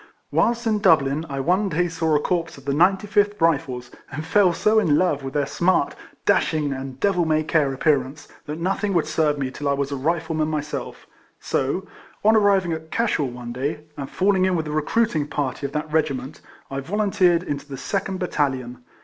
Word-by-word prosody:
Whilst 235 0 +1
in 215 -2 +1
Dublin, 160 -5 +3
I 140 -1 -3
one 185 +7 +1
day 175 +1 +1
saw 160 -2 0
a - - +4
corps 165 0 -2
of 135 - -15
the 140 - 0
95 190 +6 +2 0.2
th 205 - -16
Rifles, 135 -7 0 0.2
and 150 +3 -5
fell 190 +1 +4
so 215 +5 +3
in 155 -9 +3
love 175 -6 +1
with 135 +1 -7
their 145 -1 +2
smart, 170 +1 +1 0.3
dashing, 150 -3 +2
and 135 0 -7
devil 195 -4 +2
may 155 -1 +1
care 155 -3 +1
appearance, 140 +1 0 0.2
that 150 +1 -4
nothing 195 +3 -1
would 170 - +2
serve 155 -1 +1
me 135 -2 -2
till 145 +1 -3
I - - +3
was 140 0 -2
a - - -1
Rifleman 160 +2 -1
myself; 150 -3 -4 0.3
so, 140 +8 -1 0.4
on 220 +1 +6
arriving 195 -5 +3
at 160 0 -7
Cashel 210 - 0
one 120 -1 -7
day, 140 +4 -3
and 140 -1 -6
falling 190 0 +2
in 185 -1 +1
with 160 -2 -1
a 150 - -5
recruiting 155 +1 0
party 140 -1 -2
of - - -12
that 150 0 -3
regi 155 -3 +2
ment, 130 +2 -8 0.3
I 135 - -2
volunteered 180 +1 +2
into 145 -3 -4
the 135 - -5
2nd 195 +5 -3
battalion. 130 -8 -2
155 Hz, 200 wpm, -23 LUFS, 140-185 Hz, 0.4 s, on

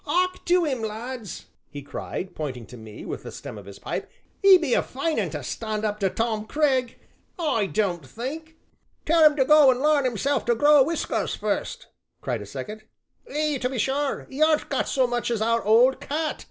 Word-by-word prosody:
"'Ark 365 +4 0
to 355 -1 +3
'im, 265 -6 -2
lads," 220 -1 -6 0.2
he 145 -2 -8
cried, 180 +6 -6
pointing 130 -6 -5
to 125 - -12
me 110 -2 -10
with - - -5
the - - -9
stern 105 - -8
of 100 - -14
his 100 - -10
pipe, - - -5 0.3
"'e 390 -1 +9
be 315 -8 -1
a - - +4
fine 305 +5 -2
un - - -1
to - - -6
stand 220 -1 -3
up 210 0 -2
to 195 -2 +1
Tom 220 0 -2
Cragg 265 -5 +1 0.4
I 280 - 0
don't 185 -6 -1
think." 295 - -7 0.5
"Tell 330 0 +4
'un 300 -1 +7
to 265 -3 +2
go 300 -1 +7
an' 250 -1 +2
larn 295 -1 +3
hisself 275 +5 -1
to 235 - +2
grow 290 +4 +6
whiskers 320 +5 -1
fust!" - - -3 0.3
cried - - -3
a - - -9
second. 215 +1 -7 0.5
"Ay, 300 -2 0
to 250 - 0
be 260 - -4
sure, 270 +5 -1
'e 270 +3 -5
aren't 310 -1 +3
got - - -1
so 260 -3 +2
much 240 0 -2
as 235 -2 -1
our 230 +1 +1
old 235 +5 +4
cat!" 310 +2 -3
255 Hz, 205 wpm, -25 LUFS, 215-300 Hz, 0.5 s, e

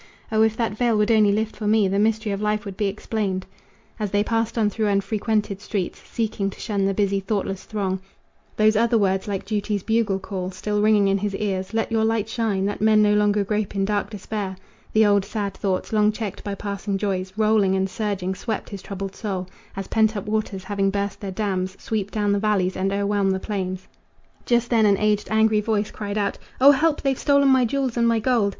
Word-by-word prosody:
O 220 0 +3
if 220 0 +3
that 225 -3 -1
veil 235 -1 +2
would 210 +2 +2
only 215 -2 +5
lift 220 +2 -1
for 210 -1 -4
me 215 -1 +4
The 195 +1 0
mystery 215 0 +1
of 200 0 -3
life 210 +1 0
would 195 -2 -6
be 205 +1 0
explained." 195 -2 -2 0.5
As 210 -2 -1
they 205 +1 +2
passed 225 +1 -1
on 220 -2 +3
through 215 +1 -1
unfrequented 205 0 0
streets, 200 -3 -3
Seeking 215 -3 -2
to - - -12
shun 200 -2 -1
the 195 - +1
busy, 200 -1 +1
thoughtless 195 -1 -3
throng, 195 -3 -2 0.6
Those 215 0 +4
other 230 +2 +3
words 190 -2 +1
like 200 -2 -3
duty's 205 -1 -2
bugle 220 -3 +1
call 190 -1 -5
Still 205 +2 -2
ringing 210 -1 +4
in 195 0 +2
his 205 0 -2
ears: 190 -2 -2
"Let 225 +1 -1
your 225 -1 +2
light 220 -1 +1
shine, 220 -4 -1
That 205 0 -3
men 215 0 +5
no 210 0 +4
longer 210 0 +3
grope 210 0 -2
in 195 0 +1
dark 205 0 -1
despair" 205 -2 -4 0.4
The 220 0 +4
old 205 -1 +4
sad 200 -1 -3
thoughts, 190 +1 -2
long 210 0 +4
checked 215 -2 -5
by 200 -1 -3
passing 200 0 -3
joys, 190 -2 -2
Rolling 215 -3 +3
and 190 0 +1
surging, 195 -2 -2
swept 220 +2 -4
his 200 -2 -6
troubled 195 -1 -6
soul 190 -4 -4 0.3
As 195 0 -4
pent 220 -1 +2
up 200 - -4
waters, 210 -3 -2
having 195 0 0
burst 200 0 -2
their 200 - -4
dams, 190 -1 -2
Sweep 210 -3 -2
down 205 -1 0
the 200 - +2
valleys 200 -3 +1
and 190 +1 0
o'erwhelm 200 0 +1
the 190 0 0
plains. 185 -2 -4 0.6
Just 240 0 +2
then 225 -2 +4
an 200 -1 +4
aged, 210 0 +1
angry 220 -1 +3
voice 210 -1 -1
cried 205 -1 -4
out: 200 -1 -1 0.2
"O 275 +2 +9
help! 295 +2 +1
they've 275 -1 +2
stolen 280 -1 +4
my 260 -2 +5
jewels 260 0 -1
and 235 0 +3
my 230 -1 +3
gold!" 225 -2 +2
210 Hz, 215 wpm, -23 LUFS, 195-220 Hz, 0.6 s, O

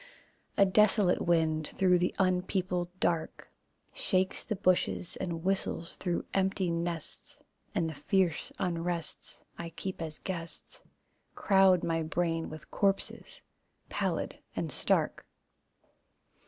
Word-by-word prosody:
A 200 - +7
desolate 200 -1 +4
wind, 160 -2 +2
through 180 -2 +3
the 180 - 0
unpeopled 180 -1 +1
dark, 165 -2 -1 0.4
Shakes 185 -1 0
the 215 - -2
bushes 185 -2 +1
and 170 -3 -3
whistles 185 -3 -1
through 175 -2 -2
empty 190 -2 +1
nests, 170 -1 -2 0.4
And 165 - +1
the 160 - -4
fierce 185 +1 0
unrests 170 -2 -3 0.2
I 170 0 -4
keep 185 +2 -6
as 155 -2 -4
guests 170 -3 -6 0.5
Crowd 190 -3 +5
my 165 -1 +1
brain 165 0 -1
with 155 0 -10
corpses, 195 -1 -1 0.5
pallid - - -2 0.2
and - - -2
stark. - - +1
175 Hz, 115 wpm, -31 LUFS, 165-190 Hz, 0.5 s, A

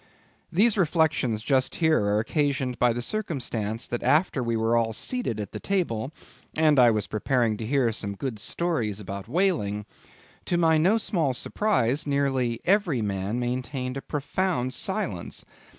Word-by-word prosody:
These 205 +4 +4
reflections 150 - +1
just 130 +1 +1
here 160 -8 +3
are 100 +1 +2
occasioned 130 +1 0
by 125 -1 +4
the 120 +1 -3
circumstance 120 - -2
that 120 - -3
after 150 -3 +2
we 115 -1 -1
were 115 +1 +1
all 115 -1 +1
seated 235 - -2
at 105 -2 -5
the - - -6
table, 145 - -1 0.4
and 155 -3 +4
I 120 -1 +7
was 105 -3 0
preparing 115 0 0
to 110 - -5
hear 130 -3 +2
some 100 -2 -4
good 120 0 -4
stories 115 - -1
about 100 0 -7
whaling; 120 - 0 0.6
to 175 - 0
my 160 -2 +4
no 190 +8 +4
small 165 - 0
surprise, 145 - 0
nearly 135 -4 0
every 175 - +2
man 100 +3 -2
maintained 125 +1 -3
a 135 - -4
profound 145 -2 -2
silence. - - -2
130 Hz, 155 wpm, -26 LUFS, 115-160 Hz, 0.6 s, I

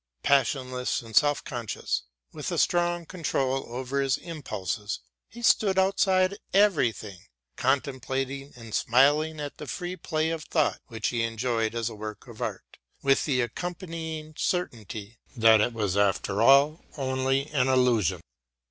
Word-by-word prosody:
Passionless 130 -2 +1
and 110 -2 -10
self 145 +3 +4
conscious, 120 -5 -3 0.3
with - - -4
a - - -2
strong 175 -1 +1
control 135 -6 -1
over 130 +3 -2
his 135 -1 +1
impulses, 110 - -4 0.3
he 235 +1 -11
stood 200 -4 +4
outside 190 0 +3 0.2
everything, 120 - +2 0.4
contemplating 135 +1 -1
and 115 -3 -11
smiling 150 +6 +3
at 145 -1 -5
the 150 - -8
free 180 +3 -4
play 160 -2 -1
of 160 -1 -4
thought 155 -3 +1
which 110 -4 -2
he 120 -2 -1
enjoyed 115 0 -1
as 115 -1 -1
a 115 - -4
work 105 0 -7
of 115 -3 -11
art, - - -5 0.2
with 135 0 +3
the 130 -4 +1
accompanying 160 - -5
certainly 115 - -3 0.2
that 110 -2 +6
it 120 - +2
was 105 -5 -1
after 100 0 +1
all 140 +6 +5
only 135 0 0
an 135 -3 +2
illusion. 125 -7 +2
135 Hz, 140 wpm, -27 LUFS, 115-155 Hz, 0.4 s, that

